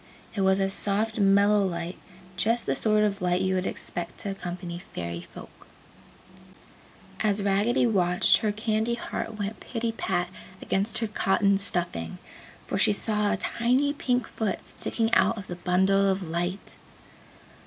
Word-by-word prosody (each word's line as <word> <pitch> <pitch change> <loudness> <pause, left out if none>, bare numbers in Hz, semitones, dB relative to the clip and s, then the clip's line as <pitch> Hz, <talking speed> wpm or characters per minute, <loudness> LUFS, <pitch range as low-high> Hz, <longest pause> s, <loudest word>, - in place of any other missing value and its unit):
It 200 - -2
was 190 0 +3
a 195 - +2
soft 210 +3 0
mellow 200 +1 +4
light, 170 -1 -3 0.4
just 225 +6 +1
the - - +1
sort 215 -1 +2
of 200 -1 0
light 180 0 +1
you 190 0 +1
would 185 0 0
expect 170 -1 -4
to 200 - -3
accompany 175 -2 -6
Fairy 85 - -6
Folk. - - -13 1.5
As 205 -2 +1
Raggedy 205 +5 +2
watched, 180 -6 +3
her 215 - 0
candy 220 +2 0
heart 225 -2 -5
went 205 +1 -4
pitty 230 -1 -3
pat 180 -5 -1 0.3
against 200 +3 -1
her 225 - -1
cotton 200 -1 +2
stuffing, 170 - -2 0.5
for - - -2
she - - +4
saw 210 0 +1
a - - 0
tiny 255 +5 +1
pink 250 -4 0
foot 215 -4 -3
sticking 225 0 0
out 225 +1 +4
of 200 - -6
the 175 - -6
bundle 190 +2 +3
of 190 -2 -1
light. 175 +4 -3
200 Hz, 155 wpm, -27 LUFS, 180-220 Hz, 1.5 s, mellow